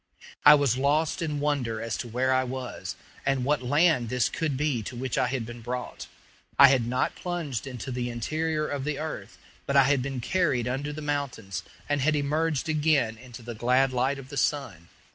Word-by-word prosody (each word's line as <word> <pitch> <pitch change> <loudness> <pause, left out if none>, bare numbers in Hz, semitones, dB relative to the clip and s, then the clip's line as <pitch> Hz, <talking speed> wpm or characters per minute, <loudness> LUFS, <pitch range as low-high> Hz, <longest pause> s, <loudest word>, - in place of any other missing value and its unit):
I 150 - +10
was 140 -4 +2
lost 150 +5 +1
in 150 -3 -2
wonder 140 -7 -1
as 115 0 -3
to 120 - -5
where 130 +3 +1
I 130 0 +3
was, 130 -1 -5 0.3
and 135 -2 0
what 145 0 +1
land 145 -2 +3
this 125 0 +1
could 155 -5 -2
be 145 -5 0
to 110 - -7
which 125 0 -3
I - - +2
had 125 -2 -2
been 120 +1 -9
brought. 125 +2 -5 0.5
I 140 - +10
had 130 -4 +2
not 125 +1 0
plunged 160 -9 -4
into 130 0 -6
the 125 0 -2
interior 155 +6 -1
of 140 -2 -3
the 150 0 -2
earth, 135 -9 -6 0.3
but 140 - 0
I 135 - +8
had 140 0 +2
been 135 0 -3
carried 135 -4 +1
under 135 +4 -2
the 150 +1 -7
mountains, 140 - -3 0.3
and 145 -1 0
had 155 +3 +2
emerged 150 +1 0
again 150 -7 +2
into 120 -1 -11
the 120 +1 -6
glad 125 +4 +2
light 130 +3 +1
of 135 -1 -10
the 145 - -7
sun. 115 - -1
135 Hz, 200 wpm, -27 LUFS, 125-150 Hz, 0.5 s, I